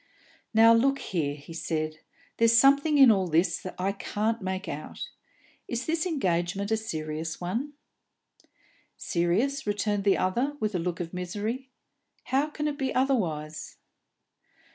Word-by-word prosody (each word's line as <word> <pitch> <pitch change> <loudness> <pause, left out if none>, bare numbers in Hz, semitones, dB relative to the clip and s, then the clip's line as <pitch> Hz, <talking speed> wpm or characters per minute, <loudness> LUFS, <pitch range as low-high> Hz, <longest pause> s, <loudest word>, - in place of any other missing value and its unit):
"Now, 225 0 +7
look 270 +4 +3
here," 155 - -2
he 150 +3 -11
said, 155 -1 -3 0.4
"there's 230 0 +5
something 280 +4 +5
in 270 -4 +9
all 190 -3 +2
this 170 +2 +1
I 190 +2 0
can't 215 +3 -2
make 190 +1 -3
out. - - -6 0.6
Is 240 +1 -3
this 325 +2 0
engagement 195 - -1
a 220 - +3
serious 160 -5 -4
one?" 230 +12 -3 1.2
"Serious?" 210 +11 0
returned 205 0 0
the 200 -1 +3
other, 245 +10 0
with 215 -3 -1
a 180 - 0
look 175 0 -2
of 170 0 -6
misery. 210 +9 -4 0.5
"How 275 +3 +1
can 300 0 -3
it 295 0 -3
be 265 -1 0
otherwise?" 165 - -1
205 Hz, 140 wpm, -27 LUFS, 175-260 Hz, 1.2 s, in